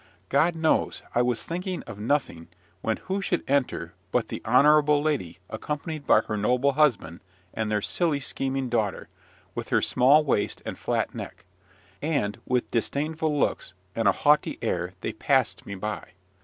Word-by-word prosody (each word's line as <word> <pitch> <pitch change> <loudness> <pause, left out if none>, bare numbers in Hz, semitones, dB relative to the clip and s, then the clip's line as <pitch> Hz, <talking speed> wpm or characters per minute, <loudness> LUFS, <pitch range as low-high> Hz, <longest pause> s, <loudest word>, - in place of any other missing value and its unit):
God 170 +1 +3
knows, 160 -1 +1
I 120 - +3
was 125 -1 0
thinking 180 +2 -4
of 100 - -9
nothing, 110 - -1 0.3
when 110 - 0
who 195 +1 -1
should 180 -2 -1
enter 140 -1 0 0.2
but - - 0
the - - -5
honourable 150 +4 +5
Lady 145 - -1
accompanied 150 +5 -5
by 110 - +6
her 110 - -4
noble 125 +6 +2
husband 125 - +1 0.3
and 110 -1 -2
their 105 -1 0
silly, 165 -5 +1
scheming 135 -1 -2
daughter, 110 -5 -1 0.4
with - - -5
her - - +3
small 140 +5 +5
waist 130 -8 0
and - - -4
flat - - -1
neck; - - -8 0.6
and, 140 -10 -1
with 125 -1 0
disdainful 150 +5 0
looks 95 - -1 0.2
and 115 - +1
a - - +7
haughty 150 +1 +2
air - - -1
they - - -3
passed - - +1
me 100 - -5
by. 95 -2 -5
135 Hz, 160 wpm, -26 LUFS, 110-150 Hz, 0.6 s, a